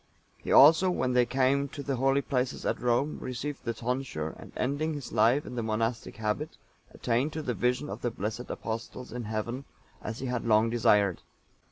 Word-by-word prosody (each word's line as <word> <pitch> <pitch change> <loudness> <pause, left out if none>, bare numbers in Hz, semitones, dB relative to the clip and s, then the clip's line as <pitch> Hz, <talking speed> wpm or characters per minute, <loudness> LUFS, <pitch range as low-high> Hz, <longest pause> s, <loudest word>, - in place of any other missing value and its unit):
(888) - - -6
He - - +1
also, 160 +7 +8
when 130 -8 0
they 125 -1 +4
came 135 +2 +2
to 140 - -7
the 135 -1 -2
holy 135 +2 +2
places 130 -1 -2
at - - -1
Rome, 125 +5 +1
received 135 +3 -5
the 115 -2 -2
tonsure, 125 - -3
and - - -11
ending 145 +4 -1
his 145 -3 -7
life 115 +6 +3
in - - -7
the 120 - -2
monastic 115 +1 -2
habit, 110 +8 -3 0.3
attained 125 +6 0
to 155 - -4
the 125 - -1
vision 125 +5 0
of - - -6
the 120 - 0
blessed 110 +3 -5
Apostles 115 +3 -5
in 120 -2 -4
Heaven, 110 +5 -3 0.4
as 110 +1 -5
he 135 - -5
had 125 -2 -2
long 110 0 +3
desired. 105 -5 +3
125 Hz, 195 wpm, -29 LUFS, 115-135 Hz, 0.4 s, also